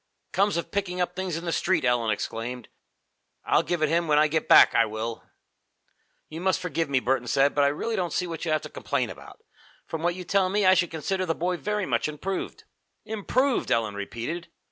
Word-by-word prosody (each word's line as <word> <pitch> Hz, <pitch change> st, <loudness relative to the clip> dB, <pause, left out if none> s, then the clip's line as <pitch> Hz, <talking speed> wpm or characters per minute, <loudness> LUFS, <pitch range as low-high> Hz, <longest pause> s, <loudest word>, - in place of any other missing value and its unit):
"Comes 200 Hz, -1 st, +2 dB
of 170 Hz, -, -4 dB
picking 190 Hz, -3 st, -2 dB
up 180 Hz, 0 st, -1 dB
things 185 Hz, -3 st, -3 dB
in 170 Hz, -, -6 dB
the 170 Hz, -, -1 dB
street!" 165 Hz, -4 st, +1 dB
Ellen 120 Hz, -2 st, +2 dB
exclaimed. 115 Hz, +3 st, -4 dB, 0.8 s
"I'll -, -, +3 dB
give 175 Hz, -3 st, -2 dB
it 155 Hz, -, +2 dB
him 170 Hz, +1 st, +1 dB
when 150 Hz, -1 st, +3 dB
I 155 Hz, +1 st, +5 dB
get 155 Hz, +1 st, -1 dB
back, -, -, +8 dB
I 115 Hz, -, +5 dB
will!" 110 Hz, +2 st, -5 dB, 1.0 s
"You 160 Hz, +2 st, -8 dB
must 190 Hz, 0 st, +1 dB
forgive 165 Hz, -3 st, -2 dB
me," 135 Hz, -2 st, +2 dB
Burton 125 Hz, -1 st, 0 dB
said, 140 Hz, +3 st, +3 dB
"but 145 Hz, -, +3 dB
I -, -, +5 dB
really 185 Hz, +11 st, -2 dB
don't 180 Hz, -4 st, -1 dB
see 180 Hz, -, 0 dB
what 165 Hz, -2 st, -6 dB
you 170 Hz, -, -2 dB
have 155 Hz, -, +1 dB
to -, -, -7 dB
complain -, -, -2 dB
about. -, -, -13 dB, 0.4 s
From 160 Hz, -, -5 dB
what 175 Hz, +1 st, 0 dB
you 185 Hz, -, -6 dB
tell 190 Hz, +1 st, +2 dB
me, 205 Hz, +1 st, +1 dB
I 185 Hz, -, +7 dB
should 180 Hz, -2 st, +2 dB
consider 185 Hz, +4 st, -2 dB
the 165 Hz, -, 0 dB
boy 180 Hz, +2 st, -1 dB
very 210 Hz, +2 st, -2 dB
much 120 Hz, 0 st, 0 dB
improved." 185 Hz, +6 st, -5 dB, 0.4 s
"Improved!" 240 Hz, +5 st, 0 dB
Ellen 110 Hz, -3 st, +1 dB
repeated. 120 Hz, -, -5 dB
165 Hz, 215 wpm, -26 LUFS, 135-185 Hz, 1.0 s, back